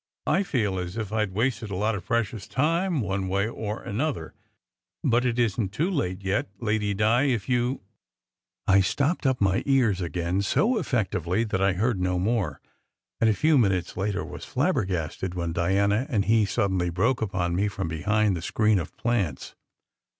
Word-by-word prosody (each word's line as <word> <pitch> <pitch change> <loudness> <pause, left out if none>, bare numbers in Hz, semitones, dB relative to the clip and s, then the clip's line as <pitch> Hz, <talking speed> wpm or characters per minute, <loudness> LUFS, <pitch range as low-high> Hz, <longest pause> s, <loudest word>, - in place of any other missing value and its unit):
I - - +2
feel 110 - -1
as 90 +3 -5
if 110 -2 -4
I 110 -1 +2
d 100 - -10
wasted 115 +2 -1
a 100 - -4
lot 105 +4 +1
of 100 -3 -4
precious 115 -3 -1
time 165 +3 +1
one 95 -2 -2
way 100 +2 +1
or 110 -1 -5
another, 140 +9 -3 0.7
but 120 +2 +2
it 120 -1 -1
isn 115 -4 +1
t - - -15
too 170 +6 +1
late 100 - -2
yet, 95 +1 0
Lady 105 -3 0
Di, 110 +6 +3
if 120 -8 0
you 125 +1 0 0.4
" - - -52
I 100 - +6
stopped 140 - 0
up 130 -1 +1
my 95 -1 +2
ears 120 -9 +3
again 85 +2 -1
so 225 - +2
effectively 100 - 0
that 105 -4 -2
I 95 0 +3
heard 105 +1 0
no 90 0 +1
more, 95 - 0 0.6
and 115 - +4
a 110 - +2
few 155 +4 +4
minutes 95 -6 +1
later 100 +1 -2
was - - -8
flabbergasted 95 - -1
when 85 -2 -2
Diana 100 - +1
and 105 -7 +1
he 110 -1 +4
suddenly 95 -3 0
broke 115 +9 +1
upon 90 -5 -1
me 100 +3 +1
from 95 -3 -3
behind 100 +5 +1
the 85 - -4
screen 105 +3 +2
of 80 - -7
plants. 100 - -1
105 Hz, 185 wpm, -26 LUFS, 95-120 Hz, 0.7 s, I